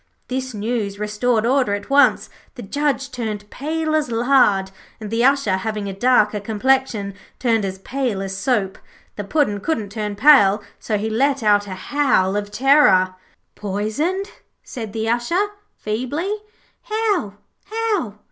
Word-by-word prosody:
This 260 -1 -3
news 210 -2 -2
restored 215 +2 0
order 250 -5 +2
at 205 +5 -8
once. 285 +1 +4 0.3
The 245 - -8
Judge 280 +4 -1
turned 215 -4 -4
pale 315 +2 -2
as 310 -4 +1
lard, 230 -5 +3 0.3
and 215 -1 -7
the 230 +1 +1
Usher, 270 -8 +3
having 210 +1 -3
a 195 - -4
darker 210 -1 +3
complexion, 220 -1 0 0.2
turned 230 -4 +1
as 190 0 -4
pale 245 0 -2
as 195 0 -5
soap. 200 -3 -1 0.4
The 205 - -4
Puddin' 210 -2 0
couldn't 215 -4 -2
turn 210 -1 -4
pale, 210 -5 +5 0.2
so 215 - -1
he 210 +2 -2
let 270 +4 +1
out 205 -1 +3
a 190 - -5
howl 200 -4 +1
of 205 0 -2
terror. 210 -6 +4 0.4
'Poisoned,' 220 - -2 0.3
said 225 -4 -7
the 220 +1 -3
Usher, 335 - +1 0.3
feebly. 255 - -2 0.5
'How, 425 - -1 0.3
how?' 430 - -2
225 Hz, 145 wpm, -20 LUFS, 205-275 Hz, 0.5 s, pale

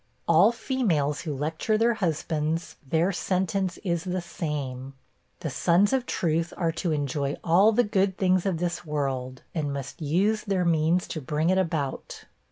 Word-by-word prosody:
All 170 +7 +6
females 215 - 0
who 150 -5 -4
lecture 160 +9 0
their 230 +2 +3
husbands, 160 -4 -2
their 165 +5 +2
sentence 185 0 -1
is 170 -3 -1
the 185 0 -2
same. 140 -6 -5 0.5
The - - -3
sons 190 +7 +3
of 260 -2 0
truth 165 0 0
are 165 -2 +1
to 165 +1 -2
enjoy 145 -1 -1
all 185 +6 +5
the 240 +3 +3
good 195 -3 +1
things 185 0 +2
of 185 -4 0
this 175 +1 -2
world, 135 -4 -3
and 150 -4 -1
must 140 +2 -6
use 195 +9 +1
their 195 -4 0
means 165 +2 +2
to 155 - -4
bring 155 +5 0
it 190 - +3
about. 160 -7 -3
170 Hz, 165 wpm, -26 LUFS, 150-190 Hz, 0.5 s, All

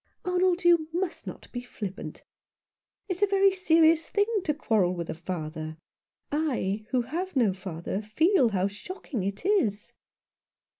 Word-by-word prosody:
"Arnold, 360 0 +2
you 340 -3 +5
must 350 +1 -3
not - - -8
be 245 - -4
flippant. 210 -6 -7 0.8
It 370 -3 -2
is - - -12
a 410 - +5
very 390 0 +4
serious 330 -3 +4
thing 410 0 +2 0.2
to 300 - +2
quarrel 205 - +1
with 170 -1 -4
a - - -3
father. 160 -2 -5 0.5
I, 235 -9 -1
who 250 -2 +1
have 345 +9 -4
no 230 -7 +3
father, 185 0 -4
feel 265 - +3
how 190 -3 0
shocking 225 - -5
it 200 - -4
is." 230 - +1
255 Hz, 150 wpm, -28 LUFS, -, 0.8 s, you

